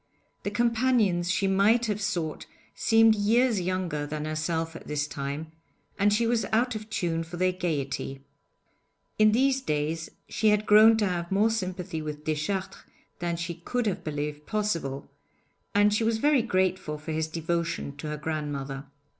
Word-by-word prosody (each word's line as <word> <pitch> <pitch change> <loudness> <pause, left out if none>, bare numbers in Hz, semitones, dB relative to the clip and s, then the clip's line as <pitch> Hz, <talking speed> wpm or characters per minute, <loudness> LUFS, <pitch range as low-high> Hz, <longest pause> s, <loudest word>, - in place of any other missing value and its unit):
The - - -2
companions 225 -5 +2
she 185 +2 +1
might 200 +5 +3
have 210 -1 -2
sought 175 -7 -2 0.3
seemed 225 - +5
years 220 +1 +2
younger 175 -5 -2
than 150 0 -4
herself 160 +1 -2
at - - -10
this 150 -1 -1
time, 145 +2 -5 0.5
and 205 +1 +4
she 225 +3 +2
was 230 -1 +1
out 230 +4 +1
of 215 0 -7
tune 165 -5 -1
for 170 +2 -8
their 185 +1 +2
gaiety. 140 -6 -3 1.0
In 215 0 +6
these 265 +3 +2
days 155 - -2 0.2
she 220 - 0
had 210 0 +2
grown 215 +2 +7
to 215 - +2
have 175 -1 -3
more 210 +3 +3
sympathy 185 -6 -3
with 150 -1 -6
Deschartres 155 +5 -2 0.4
than 170 -1 -2
she 170 0 -3
could 230 +9 -3
have 200 -4 -1
believed 150 0 -4
possible, 165 -11 -2 0.7
and 205 0 +5
she 210 - +1
was 225 0 +1
very 290 +2 +3
grateful 185 -7 0
for 155 +2 -7
his 160 0 -1
devotion 165 -2 -2
to 145 - -6
her 150 0 -3
grandmother. 145 -3 -4
180 Hz, 165 wpm, -27 LUFS, 155-215 Hz, 1.0 s, grown